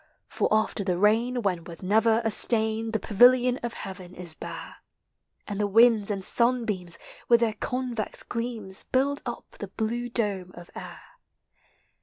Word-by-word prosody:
For - - -1
after 215 -1 +1
the 180 -2 -1
rain, 230 +5 +2
when, 180 -4 -1
with 170 +2 -11
never 220 +4 +3
a 225 - +1
stain, 220 0 +2
The 220 - 0
pavilion 245 +5 +4
of 235 -1 -4
heaven 185 -2 -8
is 175 -3 -9
hare - - -7 0.7
And 205 -1 -4
the 205 - +1
winds 225 0 +5
and 195 -2 -2
sunbeams, 225 -8 +1 0.3
with 235 -1 +5
their 225 -2 +2
COnves 245 0 -3
gleams, 230 -5 -4
Build 280 +2 +1
up 240 - -5
the 205 - -5
blue 230 +4 -3
dome 200 -6 -2
of 175 0 -12
air. - - -9
220 Hz, 155 wpm, -26 LUFS, 195-235 Hz, 0.7 s, winds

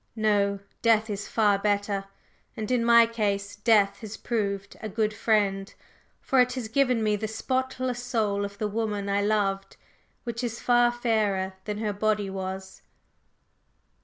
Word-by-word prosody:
No, 205 -2 +2 0.2
Death 220 -1 +3
is 200 0 -4
far 205 -3 +2
better; 205 -1 0 0.5
and 220 +1 -4
in 245 -2 +2
my 235 0 +7
case 205 -3 -2
Death 205 -2 +3
has 220 0 -8
proved 200 -4 -3
a 215 - -4
good 215 +1 0
friend, 205 -3 +1 0.5
for 265 - +1
it 250 0 +4
has 250 -3 -4
given 250 -2 +2
me 210 -1 +2
the 215 +1 -3
spotless 255 +2 -2
soul 215 -5 0
of 200 0 -6
the 215 - -1
woman 210 -2 -2
I 200 0 +1
loved, 195 -2 0 0.5
which 235 0 -4
is 235 -1 -3
far 240 0 +4
fairer 215 -6 0
than 210 -1 -3
her 210 -1 -2
body 210 -1 0
was." 190 0 -6
215 Hz, 155 wpm, -26 LUFS, 200-230 Hz, 0.5 s, my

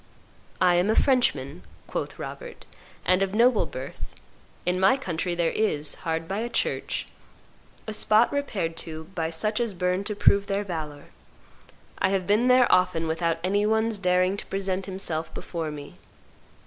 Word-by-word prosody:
"I 180 -1 +5
am 180 +4 +2
a 220 - +3
Frenchman," 175 - +2 0.2
quoth - - -4
Robert; 485 -1 -8 0.4
"and 185 +1 +3
of 195 +1 0
noble 235 +1 +4
birth. - - -8 0.5
In 180 +1 +1
my 190 +8 +5
country 175 -7 -2
there 170 -1 +1
is, 150 -9 0
hard 165 0 -2
by 195 +2 -2
a 235 +2 -2
church, - - -1 0.8
a 215 - -5
spot 215 +3 +3
repaired 210 -13 -2
to 160 -1 -4
by 160 -3 -1
such 210 +7 -1
as 230 -5 -1
burn 180 +2 0
to 210 - -3
prove 200 -1 +4
their 200 +1 0
valor. 155 -6 -6 0.9
I 190 - +3
have 190 -1 0
been 210 +6 +3
there 250 0 +6
often 180 -3 +2
without 165 +1 0
any 200 +3 +2
one's 220 -1 +1
daring 185 +1 +2
to - - -6
present 195 -1 -2
himself 165 -4 -4
before 165 -3 -4
me." 145 -1 -9
185 Hz, 160 wpm, -26 LUFS, 165-215 Hz, 0.9 s, there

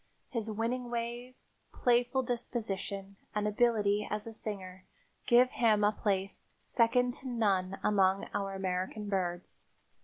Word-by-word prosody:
His 225 -3 -2
winning 235 +3 -2
ways, 240 +2 -5 0.3
playful 245 +2 +2
disposition 200 -5 -4 0.2
and 210 0 +1
ability 210 -2 +2
as 210 0 -3
a 225 - -7
singer 190 -4 -7 0.4
give 250 +1 +6
him 215 -3 +3
a 205 - +5
place 195 -2 -1
second 245 +1 +2
to 265 - -8
none 195 -6 +1
among 195 -1 +3
our 195 -1 -2
American 190 +2 -2
birds. 180 -3 -3
210 Hz, 125 wpm, -32 LUFS, 195-240 Hz, 0.4 s, give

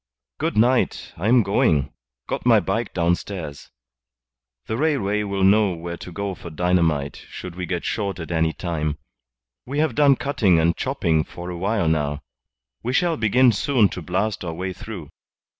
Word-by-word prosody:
"Good - - -1
night, 120 +3 +2
I 95 +6 -3
am 120 0 +5
going. 80 -8 +2 0.3
Got - - -3
my - - +6
bike - - -2
downstairs. 85 -4 -2 1.0
The 110 - -3
railway 120 -8 +1
will 100 -2 -2
know 100 0 +4
where 85 +1 -6
to 90 - -9
go 100 +2 -3
for 85 - -9
dynamite 80 -4 0
should 90 -2 -8
we 90 -1 -4
get 90 -1 -3
short 100 -4 -2
at 80 0 -6
any 80 -1 +2
time. 75 -4 -3 0.7
We 140 +3 -4
have 155 -4 +2
done 140 +1 +5
cutting 110 - +2
and 85 +1 +2
chopping 80 -2 0
for 90 +2 -8
a - - -5
while 100 0 0
now. 75 -2 0 0.6
We 125 - -2
shall 170 +3 +2
begin 125 +1 +4
soon 115 -1 +2
to 90 - -6
blast 95 +6 -1
our 85 -2 -4
way 95 +2 -3
through." 105 -8 -8
95 Hz, 170 wpm, -23 LUFS, 85-110 Hz, 1.0 s, my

